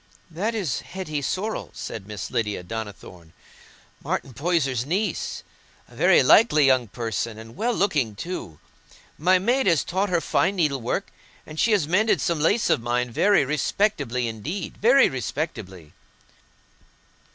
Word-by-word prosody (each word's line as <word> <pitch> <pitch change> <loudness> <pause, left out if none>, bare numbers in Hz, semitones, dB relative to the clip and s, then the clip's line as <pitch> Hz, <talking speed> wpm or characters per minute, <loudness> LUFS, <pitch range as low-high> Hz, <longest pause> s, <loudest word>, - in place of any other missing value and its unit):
"That 205 +8 -2
is 180 - -1
Hetty 165 -6 -5
Sorrel," 195 +10 -3
said 100 -3 -7
Miss 105 -1 -6
Lydia 105 -5 -2
Donnithorne, 90 -5 -8 0.7
"Martin 135 - -3
Poyser's 135 -4 0
niece—a 185 +10 -5
very - - +5
likely 155 - +5
young 130 -3 +3
person, 115 0 -4
and 115 +1 -11
well 225 +7 0
looking 145 - 0
too. 110 - -6 0.6
My 185 +4 +4
maid 240 +7 +1
has 165 -7 +3
taught 190 +3 -1
her 175 -1 +2
fine 185 +3 +1
needlework, 140 -9 -1 0.3
and 155 0 -9
she 235 - +3
has 185 -8 +2
mended 210 +6 +2
some 170 -3 0
lace 205 +9 +2
of - - +2
mine 120 +1 -1
very 200 - +3
respectably 145 - 0
indeed—very 190 - +2
respectably." 105 - -5
150 Hz, 130 wpm, -24 LUFS, 115-190 Hz, 0.7 s, very